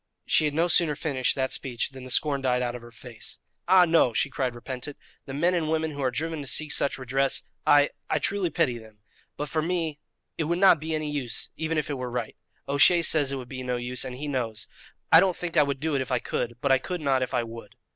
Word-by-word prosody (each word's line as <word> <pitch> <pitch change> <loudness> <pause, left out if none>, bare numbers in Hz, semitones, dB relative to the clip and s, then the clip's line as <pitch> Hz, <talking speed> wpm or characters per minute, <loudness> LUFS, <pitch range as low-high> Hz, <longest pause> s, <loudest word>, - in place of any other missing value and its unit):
She 155 - +3
had 145 -1 -1
no 165 +2 +2
sooner 165 -3 +4
finished 140 -5 0
that 130 -1 -1
speech 125 0 -2
than 130 -1 -10
the - - -9
scorn 140 +2 +1
died 125 -1 +1
out 120 -1 -2
of 125 - -7
her 120 - -12
face: 115 0 -9 0.3
"Ah, 185 0 +7
no," 160 -8 +3
she 140 - +1
cried 130 -3 -2
repentant; 130 +3 -7 0.3
"the 135 - -6
men 170 +5 +2
and 165 -3 0
women 160 0 0
who 145 -1 -6
are 130 - +2
driven 160 +4 -3
to 140 - -8
seek 155 +3 +1
such 140 - +2
redress 135 +1 0 0.2
I 145 0 +5 0.2
I - - +2
truly 195 -3 0
pity 140 -9 0
them 110 -2 -17 0.4
but 150 - -3
for 155 +2 -1
me 165 -3 -2 0.4
it 160 - +1
would 170 +3 0
not 185 -3 +6
be 160 +1 -3
any 155 -1 -3
use 135 -5 -2
even 160 0 -2
if 155 - -1
it 140 - -4
were 125 -1 -4
right. 120 -2 -4 0.3
O'Shea 155 +5 +5
says 145 -4 +3
it - - -2
would 130 -2 -7
be 130 0 -6
no 125 -1 -2
use, 125 +1 -2
and 130 -2 -6
he 145 +4 -6
knows. 115 -6 -2 0.5
I 160 - +10
don't 185 -1 +2
think 175 -2 -5
I 155 - +6
would 140 -2 -1
do 155 +2 -1
it 135 - +1
if 130 - -5
I 125 - +3
could; 120 0 -3
but 140 - +1
I 135 - +5
could 180 +6 -4
not 135 -3 +1
if 130 - -2
I 120 - +1
would." 115 -2 -10
140 Hz, 255 wpm, -26 LUFS, 125-160 Hz, 0.5 s, I